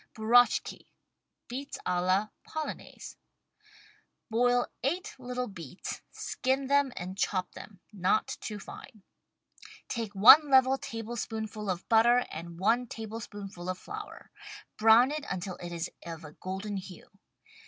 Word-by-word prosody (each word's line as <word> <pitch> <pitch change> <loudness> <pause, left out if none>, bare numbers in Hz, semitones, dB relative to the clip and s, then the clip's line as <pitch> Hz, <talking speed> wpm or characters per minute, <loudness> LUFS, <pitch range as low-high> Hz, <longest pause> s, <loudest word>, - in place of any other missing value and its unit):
BURACHKI 230 +2 +3 0.6
{Beets 270 +3 -6
a 180 -1 +1
la 190 +4 +2
Polonaise) 310 -1 -7 1.1
Boil 245 +2 +3 0.2
eight 340 +8 -2
little 250 0 -3
beets, 170 - -7
skin 265 +2 -1
them 280 0 +3
and 185 +2 -5
chop 185 -2 0
them 195 -3 -12
(not 195 +2 +1
too 210 - -5
fine). 210 +1 -11 0.8
Take 225 -4 -4
one 285 +10 +9
level 265 0 +5
tablespoonful 225 -4 -5
of 185 0 -3
butter, 235 +2 +5
and 170 +1 -7
one 235 +6 +2
table 225 0 -6
spoonful 200 -5 -8
of 185 - -2
flour. 425 - -9 0.4
Brown 225 +4 +6
it 300 0 -3
until 185 0 -4
it 175 0 -7
is 170 0 -4
of 165 -1 -7
a 150 - -9
golden 195 +4 -5
hue. 185 -2 -10
220 Hz, 130 wpm, -30 LUFS, 185-250 Hz, 1.1 s, one